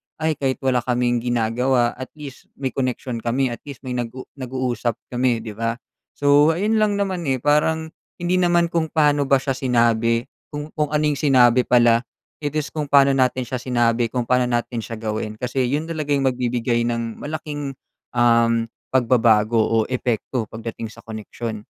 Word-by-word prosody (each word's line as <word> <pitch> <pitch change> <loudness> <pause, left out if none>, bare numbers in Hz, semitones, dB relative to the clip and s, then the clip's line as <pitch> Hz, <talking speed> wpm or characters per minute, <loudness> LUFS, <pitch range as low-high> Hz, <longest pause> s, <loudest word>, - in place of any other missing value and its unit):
ay 160 0 0
kahit 135 -2 0
wala 130 -2 +2
kaming 120 0 0
ginagawa 120 +1 +1
at 130 0 -8
least 145 -3 -10
may 135 -2 -3
koneksiyon 125 -2 -3
kami, 125 +3 0
at 120 - -6
least 140 -1 -9
may 130 - -5
nag-u 125 +1 -4 0.2
nag-uusap 125 -3 -2 0.2
kami 125 -2 +1
'di 110 - -6
ba? 115 +2 -2 0.4
So, 145 +2 +4
ayun 215 +5 +1
lang 210 -1 +2
naman, 190 -4 -2
eh, 135 - +2
parang, 160 +2 +2 0.3
hindi 175 +1 0
naman 175 -1 +2
kung 165 -2 0
paano 145 -3 +2
ba 135 - +5
siya 135 - -1
sinabi, 115 -2 +2 0.2
kung 150 +1 -7
kung 150 -1 -1
anong 150 -1 0
sinabi 125 -4 +4
pala, 120 -1 +5 0.4
it 145 -1 -4
is 155 -1 -2
kung 150 -2 -3
pa'no 140 0 +5
natin 130 -1 +1
siya 125 +1 -4
sinabi, 120 -2 +1
kung 125 +1 -2
pa'no 125 +1 +2
natin 120 0 -1
siya 115 +1 -6
gawin. 110 -1 -4
Kasi 125 +2 -1
'yun 145 +5 0
talaga 155 -3 -2
'yung 140 - 0
magbibigay 120 -1 0
ng 115 -1 -3
malaking, 145 -2 -5 0.4
um, 115 -1 +3 0.2
pagbabago 115 -3 +3
o 110 0 +2
epekto 120 -2 -1
pagdating 115 0 -6
sa 110 - -14
koneksiyon. 110 0 -6
125 Hz, 170 wpm, -22 LUFS, 115-145 Hz, 0.4 s, ba